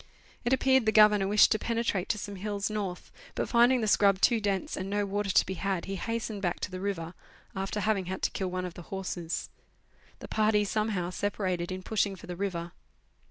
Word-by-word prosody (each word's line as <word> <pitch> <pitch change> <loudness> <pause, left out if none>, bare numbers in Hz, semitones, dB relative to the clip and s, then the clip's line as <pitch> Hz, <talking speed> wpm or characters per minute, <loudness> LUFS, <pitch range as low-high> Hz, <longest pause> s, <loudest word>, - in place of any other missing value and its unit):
It 240 - 0
appeared 265 -2 +3
the - - +5
Governor 210 -2 +6
wished 210 +1 +5
to 215 - +2
penetrate 230 -5 -1
to 210 - +1
some 205 -1 -6
hills 205 +1 -2
north, 195 -4 -4 0.2
but - - -1
finding 240 +1 +4
the 215 - 0
scrub 200 -2 +4
too 230 +1 +3
dense, 200 -2 -1
and 190 +1 -4
no 205 0 0
water 200 0 -2
to - - +4
be 190 - -4
had, 190 -1 -2
he 195 - -4
hastened 225 0 -3
back 180 -3 -1
to - - -3
the 185 - -5
river, 185 -4 -3 0.4
after 195 +2 -2
having 205 -3 +1
had 190 +1 -5
to - - +1
kill 190 -2 -2
one 185 0 -3
of 180 - -6
the 175 - -9
horses. 185 -3 -4 0.7
The - - -9
party, 215 -1 +2
somehow, 205 -4 -1
sepa 205 +2 -2
rated 180 -3 -1
in 185 0 -5
pushing 200 -2 0
for 185 - -12
the 180 - -6
river. 175 -3 -3
200 Hz, 215 wpm, -29 LUFS, 185-215 Hz, 0.7 s, Governor